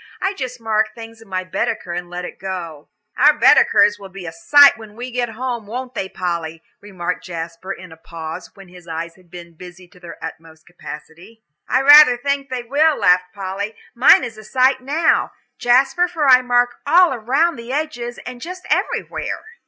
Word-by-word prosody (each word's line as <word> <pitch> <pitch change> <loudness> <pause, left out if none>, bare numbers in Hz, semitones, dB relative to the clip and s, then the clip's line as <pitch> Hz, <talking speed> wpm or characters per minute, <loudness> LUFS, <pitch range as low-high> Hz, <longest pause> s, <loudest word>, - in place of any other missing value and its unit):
I 385 +1 -1
just 255 -8 -6
mark 220 -1 -1
things 225 -1 -11
in 225 - -16
my 185 -1 -3
Baedeker 180 -1 -3
and 175 0 -5
let 180 0 -6
it - - -10
go." 170 -6 -7 0.3
"Our - - +6
Baedekers 205 0 +4
will 195 -1 -11
be 190 -1 -10
a 165 - -5
sight 285 - +6
when 215 -1 -13
we 245 +2 -7
get 245 -1 -2
home, 235 -1 -5
won't 250 +3 -6
they, 190 -5 -4
Polly?" 170 -3 -4 0.2
remarked 180 -3 -5
Jasper, 170 +1 -7
in 185 -2 -9
a 160 - -13
pause, 165 +1 -8
when 190 -3 -15
eyes 165 +1 -5
had 180 -1 -24
been 170 -1 -12
busy 180 +2 -13
to 180 - -20
their 175 -2 -11
utmost 160 0 -10
capacity. 175 +6 -12 0.3
"I 260 +1 +2
rather 290 -3 +8
think 280 +2 -2
they 255 -2 -4
will," 295 +5 +2
laughed 180 0 +2
Polly. 200 +2 -5 0.2
"Mine 255 +2 +6
is 225 -3 -7
a - - -12
sight 260 +4 +2
now, 305 +5 +1 0.3
Jasper, 270 +8 +3
for 325 -5 -1
I 255 -1 +7
mark 245 -1 +1
all 340 -2 +5
round 270 +7 +1
the 235 +2 -8
edges 265 -5 -4
and 250 -1 -8
just 365 +2 -8
everywhere." - - -2
220 Hz, 185 wpm, -19 LUFS, 180-255 Hz, 0.3 s, rather